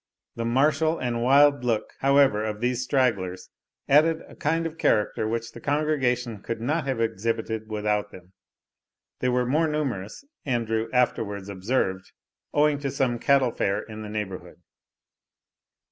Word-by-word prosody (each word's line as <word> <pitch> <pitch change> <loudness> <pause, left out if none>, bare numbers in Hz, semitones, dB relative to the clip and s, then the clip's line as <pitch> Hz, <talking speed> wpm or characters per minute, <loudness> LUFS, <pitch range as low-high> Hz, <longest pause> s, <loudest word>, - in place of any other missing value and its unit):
The 115 - -3
martial 150 +6 +2
and 120 -2 -2
wild 140 +1 +5
look, 115 -3 -1
however, 135 -6 +4
of 105 -1 -3
these 125 +1 0
stragglers, 115 -9 0 0.4
added 160 +3 +4
a - - -14
kind 165 +2 0
of 165 0 -5
character 105 +1 +1
which 115 +1 -3
the 120 - -11
congregation 130 -7 0
could 115 +1 -4
not 145 +5 -1
have 130 -3 -1
exhibited 110 0 -2
without 105 -1 -1
them. 90 -1 -15 0.9
They 125 - +1
were 125 0 +1
more 155 +6 +2
numerous, 140 - -3 0.2
Andrew 115 -4 -1
afterwards 105 -5 0
observed, 95 -1 -2 0.4
owing 150 -1 +2
to 140 -1 -2
some 125 -3 0
cattle 135 -2 +3
fair 100 0 -1
in 110 -1 -9
the 105 - -7
neighbourhood. 95 -5 -6
120 Hz, 145 wpm, -25 LUFS, 105-140 Hz, 0.9 s, wild